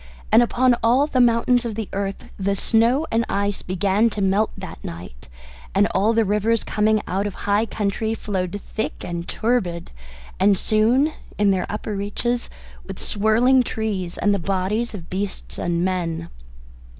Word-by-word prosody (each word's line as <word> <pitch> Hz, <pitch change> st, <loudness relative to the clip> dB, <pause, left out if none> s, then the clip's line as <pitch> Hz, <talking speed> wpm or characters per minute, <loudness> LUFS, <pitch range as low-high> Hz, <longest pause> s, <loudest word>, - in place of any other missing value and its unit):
And 225 Hz, -, +7 dB
upon 245 Hz, +1 st, +3 dB
all 250 Hz, +5 st, +4 dB
the 275 Hz, -4 st, -1 dB
mountains 240 Hz, +1 st, +3 dB
of 230 Hz, -3 st, -4 dB
the 220 Hz, -2 st, -4 dB
earth 195 Hz, 0 st, -2 dB, 0.2 s
the 200 Hz, +1 st, 0 dB
snow 235 Hz, +8 st, +2 dB
and 225 Hz, +1 st, +2 dB
ice 200 Hz, 0 st, -1 dB
began 195 Hz, +4 st, +1 dB
to 210 Hz, -, -5 dB
melt 200 Hz, +2 st, +2 dB
that 190 Hz, -1 st, -9 dB
night, 85 Hz, -8 st, -9 dB, 0.5 s
and 200 Hz, +1 st, +5 dB
all 205 Hz, +4 st, +3 dB
the 225 Hz, -1 st, +3 dB
rivers 210 Hz, +3 st, +1 dB
coming 215 Hz, 0 st, +1 dB
out 195 Hz, +2 st, -1 dB
of 200 Hz, -, -6 dB
high 205 Hz, +3 st, +2 dB
country 220 Hz, +2 st, -1 dB
flowed 195 Hz, -2 st, -3 dB
thick 220 Hz, -, -3 dB
and 170 Hz, 0 st, -4 dB
turbid, 205 Hz, -8 st, -1 dB, 0.5 s
and 195 Hz, +1 st, +4 dB
soon 240 Hz, -, +2 dB, 0.2 s
in 205 Hz, -1 st, +3 dB
their 185 Hz, -2 st, 0 dB
upper 210 Hz, 0 st, -4 dB
reaches 235 Hz, +4 st, -2 dB, 0.3 s
with -, -, -8 dB
swirling 230 Hz, +5 st, +3 dB
trees 210 Hz, -7 st, -3 dB
and 205 Hz, -, +2 dB
the 200 Hz, -, 0 dB
bodies 195 Hz, +6 st, -1 dB
of 170 Hz, -5 st, -9 dB
beasts 195 Hz, +1 st, -4 dB
and 170 Hz, 0 st, 0 dB
men. 170 Hz, -3 st, -2 dB
205 Hz, 160 wpm, -22 LUFS, 190-230 Hz, 0.5 s, And